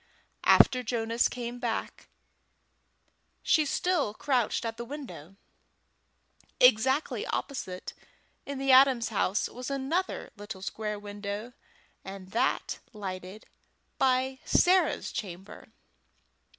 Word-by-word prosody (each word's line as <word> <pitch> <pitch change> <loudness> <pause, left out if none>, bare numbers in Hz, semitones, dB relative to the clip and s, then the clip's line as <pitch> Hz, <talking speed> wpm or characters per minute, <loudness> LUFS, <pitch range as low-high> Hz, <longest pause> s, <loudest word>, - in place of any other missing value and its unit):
After 255 - +6
Jonas 230 -1 +1
came 245 -1 -6
back 235 -3 -4 1.4
she 310 -2 +3
still 295 - 0
crouched 245 -4 0
at 225 0 -4
the 235 - -4
window. 235 - -9 1.2
Exactly 260 +4 +4
opposite 185 -10 -4 0.5
in 280 0 -5
the 270 0 +1
Adams' 260 -3 +6
house 205 -2 0
was 250 +2 -7
another 275 +7 -2
little 205 -2 -8
square 210 0 -3
window, 205 +3 -6 0.5
and 190 -1 -9
that 230 - 0
lighted 190 0 -7 1.0
Sarah's 370 +1 +3
chamber. 190 -1 -7
230 Hz, 95 wpm, -29 LUFS, 205-265 Hz, 1.4 s, After